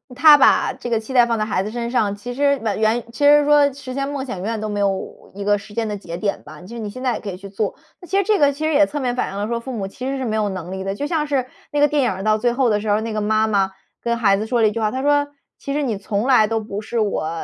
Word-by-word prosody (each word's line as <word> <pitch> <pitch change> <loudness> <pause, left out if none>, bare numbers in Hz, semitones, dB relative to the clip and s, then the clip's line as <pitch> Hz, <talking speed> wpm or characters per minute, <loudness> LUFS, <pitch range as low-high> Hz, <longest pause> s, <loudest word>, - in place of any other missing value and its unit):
他 305 +2 +8
把 - - +4
这 245 - -7
个 230 -2 +1
期 225 +4 -8
待 245 -2 +6
放 230 -1 0
在 215 - 0
孩 190 -3 -1
子 205 - -4
身 235 +1 -4
上， 210 -5 +1
其 245 +5 -7
实 280 +1 +2
晚 215 -3 -1
原 220 +2 +2
其 285 - -4
实 295 0 +7
说 290 -1 +5
实 260 -1 -8
现 275 +1 -2
梦 280 -2 -4
想 220 -8 -5
永 180 - -6
远 225 0 -2
都 215 - -3
没 205 -1 -3
有 195 -1 -3
一 200 - -5
个 205 +1 +3
时 205 +1 -12
间 225 0 -1
的 210 - -3
节 170 -4 -7
点 200 +2 -2
吧， 150 0 -12
就 180 - -12
是 - - -6
你 215 -2 -4
现 255 +5 -8
在 255 -2 +1
也 - - -4
可 205 - -6
以 180 - -6
去 200 - -10
做。 200 +1 -3 0.3
那 355 - -12
其 385 - 0
实 400 - +3
这 420 +1 +2
个 285 -1 +5
其 295 +3 -4
实 315 - +1
也 295 +1 +5
侧 295 - -4
面 250 -3 -1
反 250 - -2
映 195 - -6
了 205 - -2
说 235 0 -2
父 260 +3 -7
母 205 -6 -3
其 250 +6 -8
实 275 0 -2
是 260 - -3
没 220 -2 -1
有 215 -1 0
能 185 -2 -6
力 190 0 -4
的。 195 0 -3
就 285 - -3
像 300 -1 -1
是 275 -3 0 0.3
那 290 - 0
个 295 - +5
电 295 0 +1
影 245 - +1
儿 190 0 -5
到 215 0 +3
最 240 +2 +2
后 255 -1 +2
的 210 -1 +1
时 215 - -3
候 205 - +4
儿， 215 - 0
那 225 0 -4
个 215 - -1
妈 215 +1 +2
妈 200 -3 +1 0.3
跟 235 0 -1
孩 205 -4 +3
子 210 +2 -3
说 240 0 +1
了 220 - +5
一 - - +1
句 230 - -4
话， 215 -1 +1
她 260 +4 -4
说： 290 0 +3 0.3
“其 280 - -6
实 295 +1 0
你 235 -6 -1
从 205 +2 -2
来 245 -5 +5
都 225 +1 0
不 210 -1 -6
是 230 +2 -3
我 205 -7 -1
225 Hz, 370 characters per minute, -20 LUFS, 205-270 Hz, 0.3 s, 他